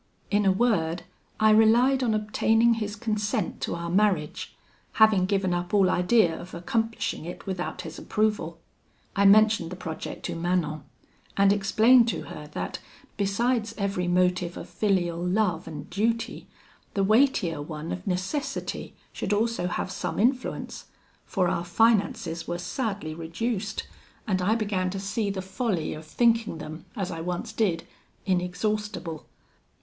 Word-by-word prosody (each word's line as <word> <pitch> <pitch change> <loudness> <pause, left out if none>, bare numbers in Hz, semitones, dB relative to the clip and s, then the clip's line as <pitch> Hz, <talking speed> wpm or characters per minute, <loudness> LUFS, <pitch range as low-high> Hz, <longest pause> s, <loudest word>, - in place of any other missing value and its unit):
In 205 -1 +3
a - - +6
word, 185 -6 +1 0.4
I 215 0 +5
relied 235 +5 +5
on 230 -4 +2
obtaining 225 +2 +3
his 215 -2 -3
consent 210 -1 -2
to - - -2
our 170 0 -4
marriage, 185 -6 +1 0.4
having 215 -4 +5
given 195 -2 +1
up 175 +3 -1
all 190 -2 +5
idea 180 -2 +3
of 180 - -10
accomplishing 225 +3 -2
it 175 - -8
without 185 -2 -3
his - - -8
approval. 210 -6 -1 0.6
I 200 - +3
mentioned 210 -3 +5
the - - -4
project 160 -3 -6
to - - -2
Manon, 165 -4 -1 0.5
and 200 0 +5
explained 220 +5 +5
to - - -2
her - - -9
that, - - -4 0.4
besides 225 +3 0
every 195 -3 -1
motive 180 0 +1
of - - -7
filial 180 -5 0
love 180 -3 0
and 150 -2 -7
duty, 230 +3 -1 0.5
the 195 - +2
weightier 205 - +3
one 155 +1 -6
of 185 +2 -5
necessity 190 +11 -3 0.2
should 205 - -2
also 220 -3 0
have 180 +1 -3
some - - -4
influence; 255 +4 -1 0.4
for 185 -4 +1
our 170 - 0
finances 175 -4 +1
were 175 - -2
sadly 200 -3 -3
reduced, 190 +6 -3 0.4
and 185 -4 0
I 205 +5 +2
began 200 -5 0
to 195 +1 -4
see 200 +2 -1
the 190 -1 -3
folly 190 -3 -2
of 155 +1 -9
thinking 230 0 +2
them, 155 +2 -8
as 195 -4 -3
I 165 - -5
once 180 +6 -4
did, 185 -7 0 0.4
inexhaustible. 185 -1 -2
195 Hz, 145 wpm, -26 LUFS, 175-220 Hz, 0.6 s, a